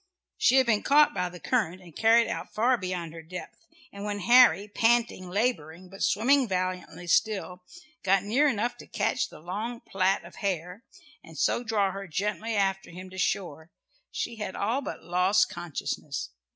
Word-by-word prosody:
She 255 - +4
had 265 -1 +5
been 220 -3 +2
caught 295 +1 +5
by 180 -1 -1
the 180 0 -11
current 200 -8 0
and 175 -4 -16
carried 230 +1 +4
out - - -5
far 240 +4 +2
beyond 180 -6 -4
her 165 - -9
depth, 180 +3 -10 0.3
and 200 0 -8
when 205 -1 -3
Harry, 240 -2 +6
panting, 225 -3 +1
labouring, 180 -5 -2
but 195 +1 -11
swimming 255 +6 +3
valiantly 185 -1 -3
still, 185 0 0 0.4
got 195 0 +2
near 250 +9 +3
enough 245 -1 -1
to - - -13
catch 215 0 -1
the - - -13
long 210 +8 -5
plait 195 0 0
of - - -13
hair, 185 +2 -3 0.4
and - - -13
so 240 - +1
draw 210 -4 +1
her 195 +1 -7
gently 210 +6 -2
after 195 -1 0
him 185 +2 -10
to 185 - -8
shore, 165 -4 -2 0.4
she 230 - -4
had 210 -3 -5
all 230 +7 0
but - - -7
lost 185 +2 +2
consciousness. 150 - -5
195 Hz, 175 wpm, -27 LUFS, 180-230 Hz, 0.4 s, Harry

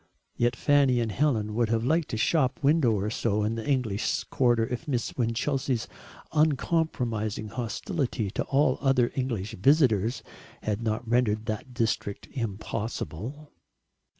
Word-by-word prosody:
Yet 120 0 +1
Fanny 140 -3 +3
and 115 -2 -1
Helen 110 -5 +1
would 115 0 +1
have 115 0 +1
liked 160 +3 +1
a - - 0
shop 135 +4 +1
window 140 -4 +4
or 105 +1 -1
so 105 -3 0
in 110 +2 0
the 115 -1 -5
English 120 -7 0
quarter 120 -3 +3
if 120 +3 -5
Miss 125 -5 -2
Winchelsea's 125 +1 -1 0.4
uncompromising 130 -9 0
hostility 120 - -2
to - - -1
all 135 -1 +2
other 135 -3 +3
English 115 -5 -2
visitors 120 - +3 0.4
had 105 0 -1
not 115 +1 -2
rendered 110 -2 +1
that 110 +3 -5
district 115 -4 -1
impossible. 115 - -4
120 Hz, 135 wpm, -27 LUFS, 110-135 Hz, 0.4 s, window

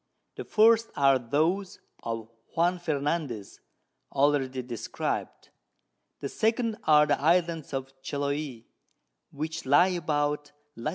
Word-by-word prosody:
The - - -6
first 225 +1 +4
are 135 -2 +4
those 160 +10 0 0.2
of 115 -1 -4 0.3
Juan 175 +2 +2
Fernandez, 145 - -2 0.5
already 135 -2 +1
describ'd. 120 -2 -4 0.7
The 140 - -2
second 225 0 0
are 150 -1 +6
the 145 -2 0
Islands 165 0 +1
of 135 -1 -4
Chiloe, 140 -3 -3 0.7
which 160 +3 -5
lie 145 +7 +6
about 150 -4 -1 0.2
Lat. 115 +6 -3
145 Hz, 110 wpm, -28 LUFS, 135-170 Hz, 0.7 s, are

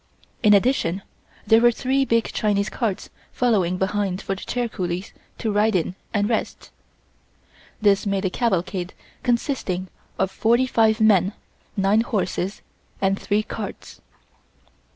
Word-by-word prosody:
In 210 -3 +6
addition 195 -4 +1 0.4
there 225 +2 +5
were 240 0 +6
three 265 +3 0
big 230 -2 +2
Chinese 205 -1 +1
carts 220 -7 -3 0.2
following 195 -8 +1
behind 190 -1 -1
for 195 - -3
the 190 - -7
chair 245 -1 -2
coolies 185 -2 -4 0.2
to 220 - -2
ride 210 +1 +2
in 180 0 0 0.2
and 205 -1 +1
rest. 225 -1 -3 1.1
This 205 -1 +3
made 195 0 0
a 185 - 0
cavalcade 185 -5 -1 0.3
consisting 235 -7 -1 0.3
of 190 0 0
forty 235 +5 +2
five 225 -3 +3
men, 205 -2 +4 0.4
nine 200 +3 +3
horses 195 -3 -2 0.4
and 195 0 +1
three 210 +1 0
carts. - - -7
205 Hz, 130 wpm, -23 LUFS, 190-230 Hz, 1.1 s, In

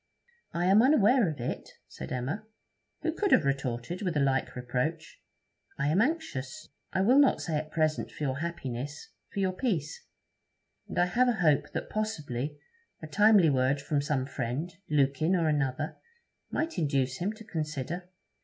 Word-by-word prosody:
'I 175 +1 0
am 195 +4 +6
unaware 245 - +5
of 150 - -6
it,' 120 - -4
said - - -8
Emma, 145 - -3 0.6
who 325 - 0
could 405 +3 0
have - - +5
retorted 135 - -2
with 180 -6 -1
a - - +3
like 135 -1 +1
reproach. 130 +6 -3 0.6
'I 140 - 0
am 175 +7 +3
anxious, 240 - -2 0.2
I 190 - +1
will 250 +8 +5
not 280 - +5
say 160 - -2
at 155 +1 -4
present 155 -1 0
for - - -7
your 135 -1 -1
happiness, 145 -4 -5 0.2
for - - -5
your 190 -1 +2
peace; 185 - -2 0.8
and - - -7
I 175 - +5
have 245 +8 +3
a - - +3
hope 160 -9 +2
that - - -4
possibly 150 - -3 0.4
a - - -8
timely 205 -1 +5
word 130 +1 +2
from 140 +1 0
some 140 -2 0
friend 135 +6 -3 0.2
Lukin 150 +4 +2
or 170 -3 +2
another 145 -1 -1 0.5
might 320 - -2
induce 135 -5 0
him 190 +4 -1
to 220 - -12
consider.' 160 - -4
155 Hz, 165 wpm, -29 LUFS, 140-195 Hz, 0.8 s, am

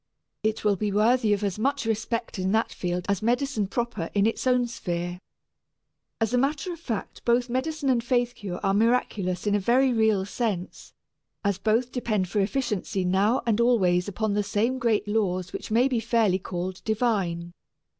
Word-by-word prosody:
It 220 0 -1
will 205 -1 +4
be 210 +2 -1
worthy 220 +2 +3
of 205 0 +1
as 200 0 -2
much 260 0 0
respect 225 -1 -2
in 185 +1 0
that 220 +1 +1
field 180 0 -3
as 200 -2 0
medicine 240 -2 0
proper 235 -6 -3
in 200 0 +3
its 225 +3 0
own 250 -1 +3
sphere. 175 -6 -4 1.0
As 225 +1 0
a 250 - +4
matter 295 +7 -1
of 335 - -10
fact 230 -10 -5
both 240 +1 +2
medicine 285 +3 -2
and 245 -3 +2
faith 245 -1 +1
cure 190 -5 -6
are 195 -1 +2
miraculous 210 -4 +1
in 205 - +2
a 205 - +3
very 250 +6 +3
real 220 -4 +2
sense, 205 -4 -4 0.5
as 200 -2 0
both 225 +4 +1
depend 215 -7 -1
for 210 - 0
efficiency 205 -3 -1
now 200 +7 +2
and 230 -1 +2
always 185 -7 +3
upon 205 +1 -1
the 205 - +2
same 225 +6 0
great 225 -3 +1
laws 185 -4 -1
which - - -6
may 235 +4 +4
be 250 -4 0
fairly 225 -4 +2
called 185 0 -5
divine. 195 -7 -1
220 Hz, 180 wpm, -26 LUFS, 195-240 Hz, 1.0 s, will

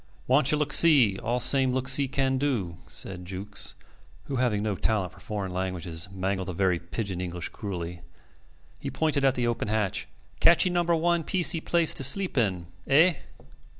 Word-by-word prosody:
"Wanchee 140 +3 +4
look 150 0 -1
see, 135 - +5
all 120 +1 -2
same 130 +1 +4
look 130 0 -2
see 135 +1 +3
can 135 -1 -1
do," 110 - -2
said 90 -2 -3
Jukes, 95 +3 -4 0.5
who 135 - -4
having 115 -5 0
no 110 -1 -1
talent 95 -2 -1
for 95 - -17
foreign 100 -1 -5
languages 90 -1 -4
mangled 95 0 -3
the 90 - -4
very 90 -1 +1
pidgin 90 +1 -5
English 90 -1 -5
cruelly. 90 -5 -6 0.8
He - - -5
pointed 155 -3 -1
at 135 -1 +3
the 120 - -1
open 120 -2 -2
hatch. 105 -3 -2 0.3
"Catchee 175 +2 +5
number 175 -1 +1
one 170 +1 +1
piecie 175 -1 +2
place 170 -2 +2
to - - 0
sleep 185 +8 +1
in. 95 -8 0 0.2
Eh?" 160 +6 +5
115 Hz, 170 wpm, -26 LUFS, 95-140 Hz, 0.8 s, see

